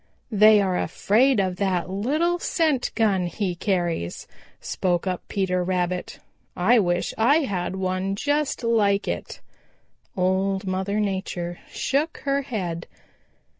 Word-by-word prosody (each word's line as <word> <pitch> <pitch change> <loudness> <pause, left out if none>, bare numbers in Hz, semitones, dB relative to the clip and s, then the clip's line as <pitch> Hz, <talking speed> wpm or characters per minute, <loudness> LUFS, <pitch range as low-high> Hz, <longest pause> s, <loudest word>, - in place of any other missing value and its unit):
"They 215 0 +6
are 185 -2 0
afraid 245 +4 +2
of 185 -2 0
that 185 -3 0
little 300 - 0
scent 310 -8 0
gun 195 -5 +2
he 185 0 -2
carries," 175 - -2 0.3
spoke 175 -1 -1
up 185 -2 -2
Peter 185 -3 0
Rabbit. 180 0 -2 0.4
"I 225 +7 +4
wish 175 -3 0
I 280 +8 +4
had 190 - -2
one 190 +1 -1
just 290 +3 -1
like 210 -3 +2
it." - - -4 0.8
Old 190 +2 +1
Mother 190 +2 -1
Nature 190 -4 -3
shook 295 +4 -1
her 275 0 +1
head. 185 -11 -4
195 Hz, 125 wpm, -24 LUFS, 180-230 Hz, 0.8 s, They